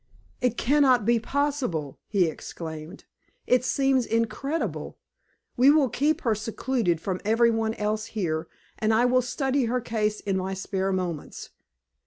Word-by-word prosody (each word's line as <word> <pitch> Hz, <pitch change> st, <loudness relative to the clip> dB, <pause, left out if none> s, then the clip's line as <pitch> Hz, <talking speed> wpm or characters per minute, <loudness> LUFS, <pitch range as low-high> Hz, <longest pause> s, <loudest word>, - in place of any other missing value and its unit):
"It 250 Hz, -2 st, +1 dB
can 290 Hz, +5 st, +2 dB
not 250 Hz, -6 st, +4 dB
be 235 Hz, +1 st, +3 dB
possible!" 250 Hz, -, -2 dB
he 195 Hz, -4 st, +2 dB
exclaimed. 160 Hz, 0 st, -7 dB, 0.4 s
"It 250 Hz, 0 st, +3 dB
seems 270 Hz, -2 st, +2 dB
incredible! 270 Hz, +7 st, -2 dB, 0.6 s
We 255 Hz, +3 st, +6 dB
will 290 Hz, -3 st, +4 dB
keep 290 Hz, +6 st, +1 dB
her 230 Hz, -, +2 dB
secluded 220 Hz, -3 st, -1 dB
from 185 Hz, +1 st, -3 dB
every 230 Hz, +3 st, +4 dB
one 225 Hz, 0 st, -1 dB
else 215 Hz, +1 st, -2 dB
here, 160 Hz, -4 st, -1 dB, 0.3 s
and 220 Hz, 0 st, +2 dB
I 235 Hz, +2 st, +4 dB
will 255 Hz, +1 st, +4 dB
study 265 Hz, +1 st, 0 dB
her 245 Hz, +2 st, 0 dB
case 215 Hz, -3 st, -1 dB
in 195 Hz, -1 st, -1 dB
my 190 Hz, +1 st, -2 dB
spare 190 Hz, 0 st, -2 dB
moments. 180 Hz, -5 st, -4 dB
225 Hz, 150 wpm, -26 LUFS, 190-255 Hz, 0.6 s, We